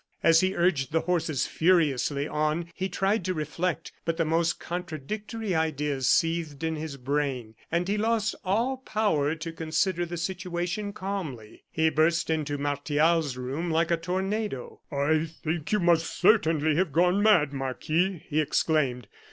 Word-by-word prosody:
As 165 0 +6
he 185 +1 +1
urged 160 -7 +1
the 160 0 +2
horses 165 -5 0
furiously 150 -5 +2
on 155 +3 -1
he 190 +1 -3
tried 195 +3 0
to 185 - -1
reflect, 165 +2 -2
but 165 -1 -1
the 165 - +1
most 165 +1 +1
contradictory 185 - -4
ideas 150 -4 0
seethed 165 -3 +1
in 160 0 0
his 155 -2 -5
brain, 135 -4 -2 0.2
and 170 +2 0
he 205 +2 0
lost 220 -1 +1
all 230 +8 +1
power 205 - 0
to 165 +1 -6
consider 165 +2 0
the 175 0 -5
situation 180 +3 -3
calmly. 170 - -6
He 160 0 +1
burst 165 +2 +2
into 150 -2 -1
Martial's 145 +1 +1
room 135 +7 -3
like 165 +1 +1
a - - +5
tornado. 190 - -3
"I 155 +3 +1 0.2
think 160 -1 -2
you 210 - +3
must 170 -2 +3
certainly 160 -7 +3
have 180 -3 +1
gone 180 +6 +3
mad, 175 -10 +4
Marquis," 155 +7 -1
he 155 +1 +1
exclaimed. 140 -5 0
165 Hz, 150 wpm, -27 LUFS, 150-180 Hz, 0.2 s, As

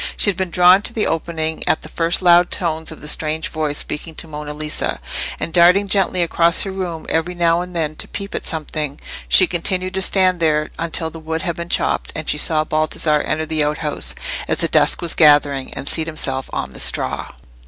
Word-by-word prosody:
She 205 - +3
had 185 - -12
been 190 -2 -2
drawn 180 +2 +5
to 235 - -2
the 220 - -1
opening 160 -1 -2
at - - +1
the - - -9
first 170 +2 -1
loud 175 0 +5
tones 160 -2 -2
of 160 - -11
the 150 - -8
strange 155 +1 -1
voice 155 -2 -2
speaking 155 +2 -5
to 165 - -6
Monna 150 -1 -7
Lisa; 150 +1 -3 0.4
and 165 - -4
darting 180 +4 +5
gently 190 -2 +1
across 170 0 +3
her 195 - -5
room 180 -4 -5
every 165 +2 -1
now 170 0 +2
and 180 0 -8
then 155 -2 -2
to - - -1
peep 200 0 -7
at - - -3
something, 155 -3 -3 0.3
she - - +6
continued 185 +2 -1
to 190 - -2
stand 185 -2 +3
there 155 -2 0
until 165 -1 -1
the 165 - -10
wood 160 +2 -4
had 170 -3 -2
been 170 0 -7
chopped, - - 0
and 155 - -5
she 150 - +2
saw 155 0 +3
Baldassarre 155 -1 0
enter 155 0 -1
the 155 -1 -1
outhouse, 150 0 -1 0.3
as - - 0
the - - +3
dusk - - +2
was 170 - 0
gathering, 145 -3 +3
and 140 - -6
seat 160 -1 +1
himself 135 -4 -2
on - - -4
the - - -10
straw. - - +1
160 Hz, 215 wpm, -19 LUFS, 155-175 Hz, 0.4 s, she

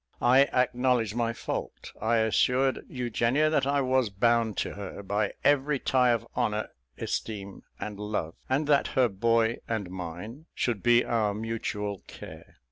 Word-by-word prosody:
I 130 +3 +6
acknowledged 125 -4 +1
my 115 -1 0
fault, 115 - -5
I 110 +2 +2
assured 125 +4 +2
Eugenia 125 +4 +1
that 150 - +2
I 140 0 +2
was 130 -3 +2
bound 115 +1 +1
to - - -2
her, 100 0 -7
by 100 +1 -1
every 145 0 +3
tie 130 -1 +2
of 115 -1 +1
honour, 110 -3 -1 0.3
esteem, 100 -3 -4 0.2
and 105 -1 -6
love; 105 -6 -3 0.2
and 135 +4 +1
that 145 -1 +3
her 130 -2 +5
boy 115 +2 +1
and 100 -5 -2
mine 95 - -7
should 115 -6 -1
be 120 0 +4
our 105 -3 0
mutual 105 -2 -3
care. - - -11
115 Hz, 150 wpm, -28 LUFS, 105-125 Hz, 0.3 s, I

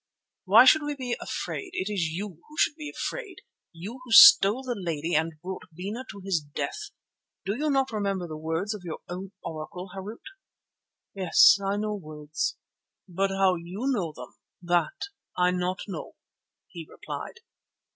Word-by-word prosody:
"Why 215 +6 +8
should 310 +4 +7
we 295 0 -3
be 250 -3 -3
afraid? 390 - -4
It 190 - -2
is 195 -6 0
you 185 +6 -4 0.2
who 305 - -15
should - - +3
be 300 -1 -7
afraid, - - -5 0.3
you 195 +9 -8
who 250 - -12
stole 225 +1 +9
the 255 -2 -2
lady 170 -4 -3
and 160 +2 +1
brought 185 +1 -5
Bena 200 +10 -6
to 200 -2 -9
his 190 -4 +1
death. 145 -1 -5 0.6
Do 200 +3 -1
you 300 +5 -1
not 270 -2 +1
remember 200 -4 -2
the 155 - -7
words 160 +7 -2
of 210 - -8
your 170 -3 -6
own 185 +2 -7
Oracle, 180 +4 -7
Harût?" 200 +4 -8 0.9
"Yes, 190 +1 +6
I 195 +1 0
know 210 0 -2
words, 155 -5 -4 0.5
but 195 +2 0
how 195 -1 +3
you 180 +7 -6
know 180 -9 -1
them 125 -4 -11 0.3
that 175 - 0 0.4
I 180 0 +3
not 180 +1 -2
know," 185 -6 -7 0.5
he 165 -2 -10
replied. 465 - -8
190 Hz, 165 wpm, -27 LUFS, 170-220 Hz, 0.9 s, stole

